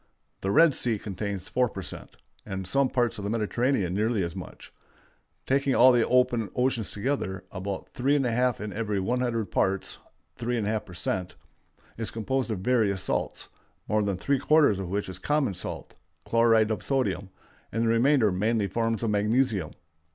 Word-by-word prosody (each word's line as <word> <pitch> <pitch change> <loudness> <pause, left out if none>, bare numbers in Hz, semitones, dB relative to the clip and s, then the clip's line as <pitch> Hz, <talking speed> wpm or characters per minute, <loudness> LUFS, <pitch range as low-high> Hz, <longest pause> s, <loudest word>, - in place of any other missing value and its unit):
The 95 - -3
Red 160 +6 +6
Sea 120 -3 +1
contains 100 -2 -5
4 125 -1 +1
per 95 -2 -7
cent., - - -8 0.3
and 95 -2 -5
some 135 +7 +2
parts 120 -4 0
of - - -6
the 100 - -2
Mediterranean 115 -2 0
nearly 110 0 +1
as 85 +1 -4
much. 95 - -10 0.7
Taking 135 0 +1
all 130 +1 +7
the 120 -2 +3
open 120 -4 +2
oceans 125 -4 0
together, 100 -5 -3
about 95 0 -5
3½ 125 -2 +1
in 105 -1 -5
every 105 -2 -1
100 115 +1 -1
parts 95 0 0 0.4
(3½ 110 -3 -1
per 90 - -11
cent.) 90 +1 -2 0.6
is 115 - -1
composed 130 +3 -2
of 105 -5 -3
various 105 -5 +1
salts, - - -2 0.4
more 105 0 +2
than 100 -2 -1
three 140 +8 0
quarters 145 -8 +4
of 95 -3 -4
which 100 +2 -2
is 95 -1 -6
common 145 -3 +1
salt 90 - -6 0.3
(chloride 115 -1 +3
of 110 - -2
sodium), 100 -9 -1 0.4
and 115 +2 0
the - - +1
remainder 115 -1 +4
mainly 105 +3 +1
forms 115 +1 -1
of 110 - +1
magnesium. 105 - +1
110 Hz, 165 wpm, -27 LUFS, 100-125 Hz, 0.7 s, all